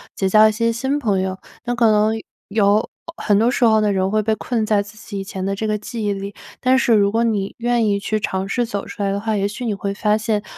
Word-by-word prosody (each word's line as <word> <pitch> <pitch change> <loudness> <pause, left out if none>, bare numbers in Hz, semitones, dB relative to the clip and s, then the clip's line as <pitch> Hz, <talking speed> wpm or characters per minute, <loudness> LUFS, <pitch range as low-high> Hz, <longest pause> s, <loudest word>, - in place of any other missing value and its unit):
结 190 - 0
交 215 +2 +7
一 - - +2
些 230 +1 +1
新 265 +5 -1
朋 210 -9 0
友。 190 0 -2 0.3
但 245 +1 -2
可 240 -1 +2
能 215 +1 +3 0.3
有， 205 +1 +2 0.3
很 205 -9 +2
多 230 +3 +3
时 250 - +2
候 220 -1 +4
这 210 -1 +1
种 190 0 0
会 215 - +2
被 220 +1 0
困 230 -2 -2
在 210 -1 +2
自 205 +1 -14
己 200 -1 -7
以 195 - -4
前 190 -1 -6
的 195 - -1
这 220 - -3
个 215 0 0
记 215 +1 -5
忆 205 - +1
里， 200 +1 -6 0.3
但 255 +1 +4
是 245 -3 +3
如 200 -2 +4
果 230 +1 +1
你 205 -4 -1
愿 240 0 +1
意 200 - +2
去 215 +1 -1
尝 190 -2 -2
试 240 +4 0
走 205 -4 -4
出 - - -8
来 195 -1 0
的 200 - -1
话， 220 +1 -1
也 200 0 0
许 215 +5 -6
你 220 - 0
会 200 0 -3
发 210 +1 +1
现， 215 -1 -1
215 Hz, 295 characters per minute, -20 LUFS, 200-230 Hz, 0.3 s, 交